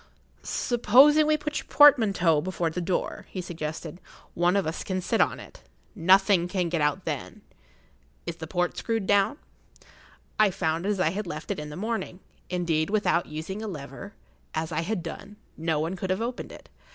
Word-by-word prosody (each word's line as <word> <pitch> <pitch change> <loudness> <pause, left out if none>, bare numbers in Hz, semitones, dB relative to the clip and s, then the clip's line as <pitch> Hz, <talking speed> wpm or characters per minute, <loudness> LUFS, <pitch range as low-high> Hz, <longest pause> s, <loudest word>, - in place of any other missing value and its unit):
"Supposing 270 +6 +4
we 305 0 +3
put 300 0 -3
your - - -11
portmanteau 200 - +5
before 175 -1 -2
the 180 - -3
door," 175 +1 -2
he 185 - -6
suggested. 165 -1 -6 0.3
"One 175 +2 +2
of 200 - +1
us 160 +1 -3
can 185 -1 -2
sit 180 - +1
on - - +1
it. - - -13 0.3
Nothing 185 +1 +4
can 180 -2 -1
get 165 -2 -1
out 150 0 0
then. - - -5 0.8
Is 170 -1 -5
the 160 - -7
port 175 +1 -1
screwed 225 -3 -2
down?" 205 +8 +2 1.0
I 215 -1 +6
found 170 -1 -1
it - - +1
as 205 -2 0
I 165 -3 +2
had 200 +1 -4
left 150 -1 -5
it - - -3
in 150 0 -6
the 150 - -8
morning. 220 -2 -3 0.3
Indeed, 165 -3 0
without 205 -5 +1
using 160 +7 -6
a 220 - -4
lever, 155 +3 -8 0.4
as 160 +1 -2
I 160 - -1
had 180 0 -3
done, 200 +5 -8 0.2
no 160 -1 -1
one 165 +4 -2
could 190 0 -5
have 185 +1 0
opened 240 +2 -4
it. - - -13
180 Hz, 190 wpm, -26 LUFS, 165-205 Hz, 1.0 s, I